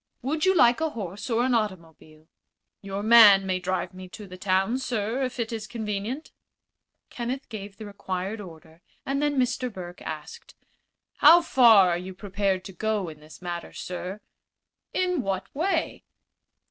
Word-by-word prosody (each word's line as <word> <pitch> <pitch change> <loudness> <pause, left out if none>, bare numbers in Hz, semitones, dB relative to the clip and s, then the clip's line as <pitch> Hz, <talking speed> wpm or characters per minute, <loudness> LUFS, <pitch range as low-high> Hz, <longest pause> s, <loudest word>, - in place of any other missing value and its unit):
"Would 305 +5 0
you 380 0 +4
like 245 -2 +5
a 320 - +1
horse 205 - -6
or 235 0 +2
an 260 - +1
automobile?" 165 -7 -4 0.5
"Your 195 0 -5
man 215 -4 +8
may 185 -1 -1
drive 185 +1 -2
me 185 0 -10
to 210 +3 -10
the 185 -2 -10
town, 190 +6 0
sir, 240 -1 -2
if 255 -1 -3
it 230 0 -2
is 220 -1 -5
convenient." 220 +5 -4 0.8
Kenneth 250 +3 -4
gave 200 -3 -8
the 215 - -8
required 200 +1 -4
order, 165 -2 -13 0.2
and 275 +1 -1
then 295 -1 0
Mr. 250 0 0
Burke 180 -3 -9
asked: 155 0 -8 0.6
"How 335 +4 +7
far 225 - +6
are 170 - 0
you 185 +1 -8
prepared 195 -1 -2
to 195 - -8
go 210 -1 -1
in 155 -1 -11
this 155 +4 -15
matter, 175 -1 -5
sir?" 185 +3 -6 0.7
"In 360 -4 0
what 195 -3 -4
way?" 345 +7 -1
205 Hz, 160 wpm, -26 LUFS, 185-245 Hz, 0.8 s, man